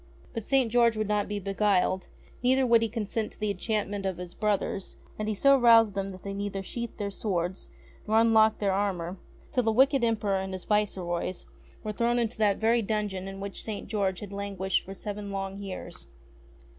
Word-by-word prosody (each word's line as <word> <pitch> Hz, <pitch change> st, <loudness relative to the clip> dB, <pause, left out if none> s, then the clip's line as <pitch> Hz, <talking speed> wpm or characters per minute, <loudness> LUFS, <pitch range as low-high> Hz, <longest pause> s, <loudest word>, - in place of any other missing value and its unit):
But 230 Hz, -, -4 dB
St. 265 Hz, -2 st, +2 dB
George 235 Hz, -2 st, +4 dB
would 215 Hz, -1 st, 0 dB
not 210 Hz, -1 st, +1 dB
be 205 Hz, -, -3 dB
beguiled; 195 Hz, -2 st, +1 dB, 0.3 s
neither 260 Hz, +2 st, +3 dB
would 235 Hz, -2 st, +5 dB
he 225 Hz, -, 0 dB
consent 220 Hz, 0 st, -3 dB
to -, -, -20 dB
the 210 Hz, -1 st, 0 dB
enchantment 205 Hz, 0 st, -2 dB
of 190 Hz, -2 st, -2 dB
his 180 Hz, -1 st, -7 dB
brothers; 205 Hz, -2 st, -1 dB, 0.2 s
and 215 Hz, -, -2 dB
he 215 Hz, -, 0 dB
so 275 Hz, +6 st, +6 dB
roused 230 Hz, -3 st, +6 dB
them 195 Hz, 0 st, -2 dB
that 185 Hz, -1 st, -10 dB
they 200 Hz, -, -4 dB
never 200 Hz, -1 st, -3 dB
sheathed 235 Hz, +4 st, -5 dB
their 200 Hz, -1 st, -3 dB
swords 185 Hz, -3 st, -2 dB, 0.4 s
nor 220 Hz, +1 st, +3 dB
unlocked 220 Hz, -1 st, +5 dB
their 200 Hz, -2 st, +1 dB
armour 190 Hz, -2 st, -1 dB, 0.3 s
till 250 Hz, -, +2 dB
the 225 Hz, -2 st, +1 dB
wicked 265 Hz, +3 st, +4 dB
Emperor 210 Hz, -4 st, +1 dB
and 190 Hz, 0 st, -4 dB
his 185 Hz, -, -6 dB
viceroys 185 Hz, -4 st, -1 dB, 0.4 s
were 215 Hz, -, -2 dB
thrown 235 Hz, +3 st, +1 dB
into 235 Hz, -1 st, -1 dB
that 205 Hz, -2 st, +3 dB
very 230 Hz, +2 st, +3 dB
dungeon 205 Hz, -3 st, -2 dB
in 195 Hz, 0 st, -7 dB
which 200 Hz, 0 st, -6 dB
St. 215 Hz, -2 st, -5 dB
George 195 Hz, -3 st, -1 dB
had 200 Hz, -1 st, -7 dB
languished 195 Hz, -2 st, -1 dB
for 195 Hz, -, -8 dB
seven 205 Hz, 0 st, -6 dB
long 195 Hz, 0 st, -4 dB
years. 195 Hz, -2 st, -7 dB
205 Hz, 195 wpm, -28 LUFS, 195-225 Hz, 0.4 s, so